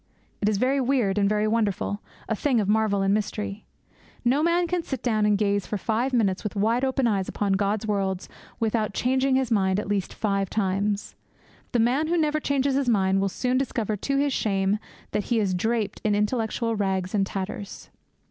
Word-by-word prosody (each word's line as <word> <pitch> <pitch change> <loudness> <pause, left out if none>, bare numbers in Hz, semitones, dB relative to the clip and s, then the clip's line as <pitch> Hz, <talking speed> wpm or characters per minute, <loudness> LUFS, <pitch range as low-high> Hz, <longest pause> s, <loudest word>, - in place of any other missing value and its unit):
It 210 - +3
is 210 - +1
very 265 +5 +2
weird 240 -7 +1
and 200 -1 +3
very 210 0 +1
wonderful, 210 -2 0 0.3
a 220 - 0
thing 255 +1 +1
of 205 - 0
marvel 210 -2 +2
and 195 - +2
of - - +4
mystery. 210 0 -3 0.6
No 265 +5 +3
man 340 +2 +2
can 350 +1 -1
sit 270 -5 -5
down 215 -3 +2
and 205 -1 +3
gaze 200 -1 0
for 210 - -2
five 230 +6 0
minutes 205 -7 +1
with 210 - -4
wide 225 +5 +1
open 265 -1 +1
eyes 200 -5 +1
upon 200 -1 0
God's 200 +2 0
worlds 195 -3 -1 0.3
without 220 -3 0
changing 260 +1 +2
his 260 -2 0
mind 190 -2 +2
at 210 - -4
least 200 -2 -1
five 195 -3 0
times. 200 0 -1 0.6
The 245 - +1
man 255 +7 +2
who 345 +2 +1
never 305 -1 +1
changes 280 -2 +1
his 270 -2 +1
mind 195 -3 +2
will 195 - +1
soon 250 +6 0
discover 230 -5 -1
to 275 +7 -1
his 280 0 +1
shame 195 -1 +1 0.3
that 210 - -1
he 235 - +1
is 195 -3 +1
draped 215 +2 -1
in 210 -1 +2
intellectual 225 +1 0
rags 190 -2 -1
and 205 -2 +2
tatters. 195 +1 -6
215 Hz, 200 wpm, -25 LUFS, 200-250 Hz, 0.6 s, of